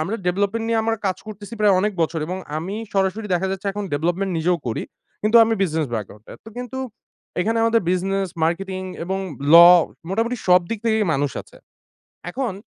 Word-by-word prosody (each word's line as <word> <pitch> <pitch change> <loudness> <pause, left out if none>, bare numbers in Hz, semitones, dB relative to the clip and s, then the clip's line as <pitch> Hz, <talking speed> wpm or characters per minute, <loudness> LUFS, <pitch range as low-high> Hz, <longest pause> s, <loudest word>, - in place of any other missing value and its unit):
আমরা 190 +8 -2
ডেভলপমেন্ট 200 +5 0
নিয়ে 225 -1 +2
আমরা 225 0 0
কাজ 185 -1 0
করতেছি 210 +1 -9
প্রায় 205 -2 +5
অনেক 210 +1 0
বছর। 165 0 -1
এবং 185 +2 -4 0.2
আমি 185 +5 -5 0.2
সরাসরি 195 +2 0
দেখা 185 +2 0
যাচ্ছে 195 +1 -5
এখন 205 0 -4
ডেভলপমেন্ট 175 +6 -1
নিজেও 175 +2 +1
করি। 115 - -2 0.4
কিন্তু 215 +2 +4
আমি 225 0 +1
বিজনেস 160 -4 0
ব্যাকগ্রাউন্ডে। 105 0 -7
তো 225 - -10
কিন্তু 250 +1 -6 0.6
এখানে 225 +4 0
আমাদের 230 0 +3
বিজনেস, 190 +1 0 0.2
মার্কেটিং 185 +3 -2 0.2
এবং 190 +2 -2 0.4
law 175 +1 +10 0.3
মোটামুটি 230 +5 0
সব 180 0 +7
দিক 230 - -2
থেকেই 220 -1 +2
মানুষ 140 0 0
আছে। - - -20 0.7
এখন 250 -1 -2
195 Hz, 175 wpm, -22 LUFS, 175-220 Hz, 0.7 s, law